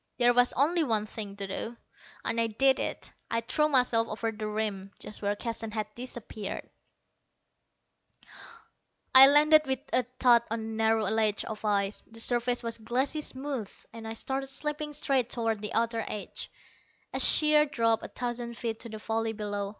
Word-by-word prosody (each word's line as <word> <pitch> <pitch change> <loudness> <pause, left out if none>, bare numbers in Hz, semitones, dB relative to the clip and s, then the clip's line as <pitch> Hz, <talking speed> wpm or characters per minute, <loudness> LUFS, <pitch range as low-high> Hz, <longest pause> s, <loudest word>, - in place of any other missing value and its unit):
There 245 -1 +5
was 245 0 +5
only 320 +5 +2
one 220 -6 0
thing 210 -2 -6
to 200 -1 -4
do, 225 +4 -5 0.5
and 230 0 +1
I 230 - +2
did 265 +5 +3
it. - - -3 0.2
I 230 - 0
threw 300 +6 +1
myself 250 -4 +3
over 225 +1 -3
the 215 0 -5
rim, 210 -2 -2
just 210 - -9
where 205 0 0
Keston 225 0 -5
had 215 -1 -4
disappeared. 235 -4 -6 2.5
I 265 +1 +11
landed 300 +2 +6
with 265 0 +1 0.2
a - - +5 0.2
thud 240 -2 +6
on 230 +1 -2
a - - -5
narrow 220 0 +1
ledge 215 0 +1
of 215 0 -7
ice. 200 -1 0
The 225 0 -13
surface 245 +1 +1
was 230 0 -4
glassy 260 +7 -1
smooth, 265 -6 -4 0.2
and 225 -1 -8
I 225 - -4
started 270 +4 -4
slipping 300 +2 -4
straight 270 -4 0
toward 225 -3 -1
the 210 +1 -4
outer 230 0 0
edge, 210 - -6 0.6
a - - -1
sheer 300 0 +4
drop 230 -5 +1
of - - -7
a - - -9
thousand 240 -1 -4
feet 225 -2 -3
to 235 - -8
the 220 - -7
valley 225 +1 -2
below. 205 -2 -3
230 Hz, 175 wpm, -29 LUFS, 215-255 Hz, 2.5 s, I